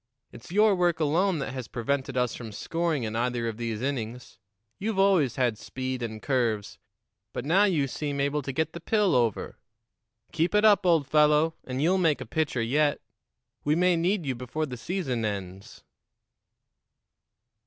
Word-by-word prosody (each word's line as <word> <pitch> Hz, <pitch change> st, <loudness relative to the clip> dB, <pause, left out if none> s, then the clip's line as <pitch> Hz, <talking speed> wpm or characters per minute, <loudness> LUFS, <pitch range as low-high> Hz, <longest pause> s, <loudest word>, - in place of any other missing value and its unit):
It's 120 Hz, +7 st, -13 dB
your 210 Hz, +2 st, +5 dB
work 175 Hz, -3 st, +1 dB
alone 165 Hz, +4 st, +2 dB
that 135 Hz, -2 st, -4 dB
has 130 Hz, -3 st, -5 dB
prevented 130 Hz, +2 st, -2 dB
us 125 Hz, -2 st, +1 dB
from 115 Hz, -3 st, -7 dB
scoring 165 Hz, +5 st, -2 dB
in 110 Hz, 0 st, -3 dB
either 120 Hz, 0 st, -1 dB
of 110 Hz, -2 st, -4 dB
these 115 Hz, -1 st, -3 dB
innings. 125 Hz, -3 st, -4 dB, 0.4 s
You've 215 Hz, 0 st, -2 dB
always 190 Hz, -, +3 dB
had 120 Hz, -5 st, 0 dB
speed 130 Hz, -1 st, -4 dB
and 110 Hz, -2 st, -4 dB
curves, 115 Hz, -6 st, -1 dB, 0.5 s
but 125 Hz, -, -4 dB
now 185 Hz, +7 st, +4 dB
you 160 Hz, -9 st, +1 dB
seem 145 Hz, +1 st, -4 dB
able 140 Hz, +2 st, 0 dB
to 135 Hz, -, -4 dB
get 160 Hz, +4 st, -1 dB
the 170 Hz, -, -6 dB
pill 205 Hz, +1 st, +1 dB
over. 115 Hz, -4 st, 0 dB, 0.7 s
Keep 170 Hz, +4 st, 0 dB
it 210 Hz, +1 st, +4 dB
up, 205 Hz, -3 st, +5 dB
old 165 Hz, -4 st, +4 dB
fellow, 150 Hz, +2 st, +3 dB
and 130 Hz, +2 st, -2 dB
you'll 185 Hz, +4 st, +3 dB
make 160 Hz, -5 st, +2 dB
a 130 Hz, -, -6 dB
pitcher 135 Hz, -1 st, -1 dB
yet, 145 Hz, +5 st, +1 dB, 0.6 s
We 150 Hz, +1 st, +2 dB
may 180 Hz, +1 st, +3 dB
need 175 Hz, +1 st, 0 dB
you 135 Hz, -, -1 dB
before 125 Hz, +6 st, -3 dB
the 130 Hz, -4 st, -6 dB
season 130 Hz, -3 st, -3 dB
ends." 95 Hz, -2 st, -5 dB
140 Hz, 170 wpm, -27 LUFS, 120-170 Hz, 0.7 s, your